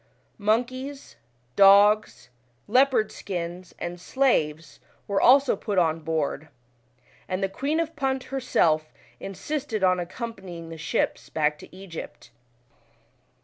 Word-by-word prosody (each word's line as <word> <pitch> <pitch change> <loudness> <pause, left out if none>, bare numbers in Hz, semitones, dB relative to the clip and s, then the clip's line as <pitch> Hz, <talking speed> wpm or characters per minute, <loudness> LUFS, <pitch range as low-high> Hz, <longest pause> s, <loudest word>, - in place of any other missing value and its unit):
Mon 215 +4 +2
keys, 270 +3 -9 0.4
dogs, 205 0 +5 0.4
leopard 250 -1 +3
skins, 175 -1 -6
and 175 0 -6
slaves, 160 - 0 0.3
were 200 -1 0
also 270 +2 +6
put 205 -3 -4
on 165 -2 +2
board, 155 -1 -2 0.8
and 185 +1 -2
the - - +2
Queen 280 +11 -2
of 330 -1 -2
Punt 265 -2 -1
herself 165 -12 +1 0.3
insisted 215 +3 -4
on 185 -1 +3
accompanying 180 -3 -7
the 165 - -7
ships 155 - -2
back 150 -1 0
to - - -14
Egypt. 185 -9 -9
195 Hz, 115 wpm, -25 LUFS, 170-255 Hz, 0.8 s, also